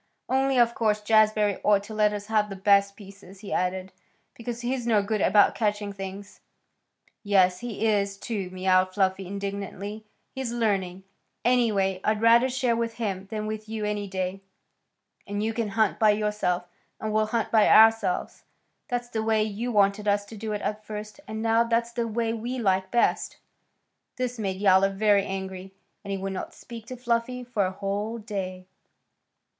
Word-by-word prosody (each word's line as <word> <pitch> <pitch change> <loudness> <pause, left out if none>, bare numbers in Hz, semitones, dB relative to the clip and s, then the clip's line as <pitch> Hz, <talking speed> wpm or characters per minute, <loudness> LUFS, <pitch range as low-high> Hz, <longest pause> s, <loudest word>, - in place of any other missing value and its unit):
"Only, 265 0 +1
of 235 -1 +4
course, 215 -3 +1
Jazbury 215 -1 +3
ought 205 -1 +3
to 215 +2 -9
let 210 -1 +3
us 205 -1 -5
have 210 -1 +1
the 195 - -6
best 200 0 +3
pieces," 195 -1 -14
he 205 - -6
added, 185 +1 -1 0.4
"because 235 0 -6
he's 245 0 -2
no 215 -3 +3
good 210 0 -1
about 205 +2 +5
catching 205 -2 -1
things." 195 +1 -8 0.8
"Yes, 185 -3 +3
he 225 -3 -4
is, 200 -2 +1
too," 200 -4 -4
mewed 185 0 +2
Fluffy 190 -1 0
indignantly. 200 +1 -5 0.3
"He's 265 -3 -4
learning. 195 -6 -1 0.4
And 245 - +5
anyway, 200 -6 +1
I'd 215 0 +1
rather 235 +3 +5
share 250 -2 +1
with 230 0 -2
him 195 -4 -3
than 215 -1 -4
with 215 0 -5
you 220 -1 -3
any 210 -1 -2
day, 190 0 -3 0.9
and 205 +1 -2
you 225 +1 -1
can 230 -1 -1
hunt 210 0 +1
by 215 - +5
yourself, 210 -4 0 0.3
and 215 -1 -3
we'll 215 0 +2
hunt 225 0 -1
by 220 -2 +5
ourselves. 225 -4 +4 0.4
That's 245 -1 -3
the 220 -2 -2
way 220 -1 +2
you 220 +3 -3
wanted 205 0 +2
us 205 0 +2
to 220 - -11
do 215 +1 -5
it 210 - -4
at 215 0 -3
first, 210 +3 -7
and 220 +1 -5
now 225 0 +3
that's 235 0 0
the 235 -1 -2
way 225 0 -1
we 235 +3 -4
like 190 -4 +1
best." 240 +2 +1 0.8
This 250 -1 -3
made 190 -3 -2
Yowler 195 -1 +5
very 200 0 +3
angry, 190 -1 -6 0.3
and 200 - -9
he 195 - -1
would 195 0 -4
not 190 - -6
speak 230 -2 -10
to 255 - -7
Fluffy 245 +1 -1
for 220 -6 0
a - - -4
whole 205 +4 -3
day. 190 -4 -5
210 Hz, 180 wpm, -26 LUFS, 195-225 Hz, 0.9 s, about